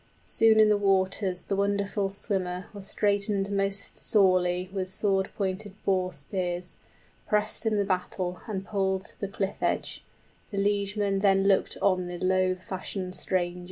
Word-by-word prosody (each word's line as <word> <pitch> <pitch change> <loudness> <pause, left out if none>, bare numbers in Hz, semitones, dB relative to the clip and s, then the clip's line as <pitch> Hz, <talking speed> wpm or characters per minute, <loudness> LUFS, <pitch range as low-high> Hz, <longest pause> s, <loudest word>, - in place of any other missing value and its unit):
Soon 220 -1 +4
in 215 - +7
the 210 -1 +3
waters 190 -2 +1
the 195 - -2
wonderful 200 0 0
swimmer 185 -2 -2
Was 200 -1 -6
straitened 200 -1 +1
most 195 0 -1
sorely 185 -3 +3
with 190 -2 -2
sword 195 0 0
pointed 195 0 -3
boar 185 -2 +1
spears, 175 +4 -4 0.5
55 - - -26
Pressed 210 +2 0
in 215 -1 +2
the 200 - +1
battle 180 -1 -2
and 195 -3 -4
pulled 190 -2 0
to - - -12
the 200 - -2
cliff 195 0 -3
edge; - - -1 0.5
The 200 - -6
liegemen 200 0 +1
then 195 -1 +4
looked 195 -1 +2
on 185 -2 +2
the 175 0 -5
loath 185 0 +1
fashioned 185 0 -5
stranger. 180 -1 0
195 Hz, 160 wpm, -27 LUFS, 185-200 Hz, 0.5 s, in